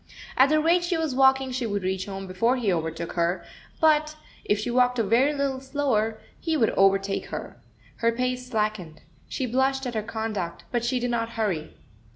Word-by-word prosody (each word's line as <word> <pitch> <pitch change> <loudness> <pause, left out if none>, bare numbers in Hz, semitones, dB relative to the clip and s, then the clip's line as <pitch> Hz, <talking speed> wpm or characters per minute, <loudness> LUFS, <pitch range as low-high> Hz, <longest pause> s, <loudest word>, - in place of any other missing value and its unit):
At 265 +2 +5
the 310 0 +4
rate 340 +3 +3
she 345 -1 0
was 320 -4 -1
walking 265 0 +4
she 250 -2 -2
would 200 -2 -2
reach 185 +1 -2
home 195 -1 -6
before 190 +7 +1
he 225 -7 +1
overtook 165 0 -3
her, 170 +1 0 0.3
but, 310 -1 +3 0.3
if 205 - +1
she 220 +4 -3
walked 250 0 +3
a 230 - +2
very 235 +8 +3
little 280 -2 -1
slower, 255 -6 0 0.2
he 325 -2 0
would 225 -6 +3
overtake 195 0 +2
her. - - -7 0.4
Her 230 0 +2
pace 250 +1 -2
slackened. 210 -8 -2 0.3
She 260 - -2
blushed 265 +2 +1
at 245 - -3
her 220 - -1
conduct, 215 -5 -4
but 240 -2 0
she 250 +1 0
did 245 0 -1
not 230 -1 -1
hurry. 185 -9 -2
235 Hz, 195 wpm, -26 LUFS, 200-265 Hz, 0.4 s, At